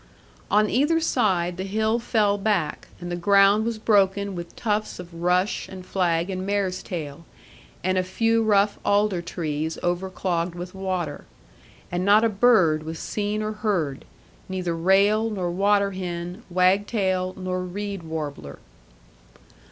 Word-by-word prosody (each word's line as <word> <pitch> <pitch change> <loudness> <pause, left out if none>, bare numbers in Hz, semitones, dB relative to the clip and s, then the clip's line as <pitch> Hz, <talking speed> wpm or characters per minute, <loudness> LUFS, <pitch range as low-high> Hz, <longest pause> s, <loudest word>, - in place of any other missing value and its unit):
On 210 +1 +4
either 295 +9 +2
side, 185 - +1
the 190 - -3
hill 220 +4 0
fell 215 -3 +2
back, 195 -7 -1
and 175 -1 -6
the - - -1
ground 200 +3 +4
was 230 -1 -2
broken 200 -2 +2
with 175 -1 -7
tufts 215 -1 -2
of 180 -1 -10
rush, 180 +3 0
and 185 -1 -9
flag, 175 -1 0
and 185 0 -3
mares 195 -2 -1
tail, 160 -3 -6 0.6
and 185 +1 +1
a - - +1
few 225 +5 +1
rough 205 -1 +2
alder 205 -3 +2
trees 160 -2 -3
overclogged 175 -1 -1
with 175 +1 -7
water. 185 -6 -3 0.7
And 175 +1 -1
not 205 +3 +5
a 230 - +4
bird 195 -8 +4
was 160 +1 -6
seen 210 +3 -2
or 215 - -2
heard, 195 -11 -2 0.4
neither 180 -3 -2
rail 200 +6 +3
nor 185 -5 -2
water 200 +2 +2
hen, 180 +1 -5
wag 185 +3 +3
tail 185 -4 -1
nor 185 -1 -3
reed 200 +1 -5
warbler. 150 - -6
190 Hz, 145 wpm, -24 LUFS, 175-205 Hz, 0.7 s, not